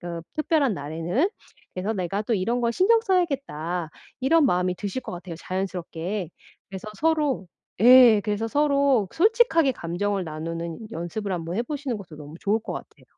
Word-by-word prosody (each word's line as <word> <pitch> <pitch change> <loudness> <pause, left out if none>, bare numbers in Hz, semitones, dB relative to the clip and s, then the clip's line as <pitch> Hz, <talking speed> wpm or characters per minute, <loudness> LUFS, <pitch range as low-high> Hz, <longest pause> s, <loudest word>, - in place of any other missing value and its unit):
그 170 -1 -5
특별한 305 - +1
날에는. 165 - -1 0.4
그래서 190 +4 -2
내가 195 +1 -2
또 225 +1 0
이런 230 +6 0
것 235 0 +1
신경 450 - +4
써야겠다.' 275 - -1 0.3
이런 315 +4 +4
마음이 180 -6 +2
드실 205 +6 -4
것 - - -8
같아요 175 -1 -7
자연스럽게. 185 0 -4 0.4
그래서 195 +2 -7
서로 300 - +1 0.3
예. 240 -2 +8
그래서 215 +1 -2
서로 280 -6 +2
솔직하게 390 - +4
감정을 190 +2 -2
나누는 165 +6 -6
연습을 185 +4 -4
한번 170 -1 -3
해 235 - +1
보시는 275 -3 -3
것도 175 -6 -11
너무 150 +1 -10
좋을 210 +3 +1
것 - - -6
같아요. - - -10
205 Hz, 355 characters per minute, -25 LUFS, 175-275 Hz, 0.4 s, 예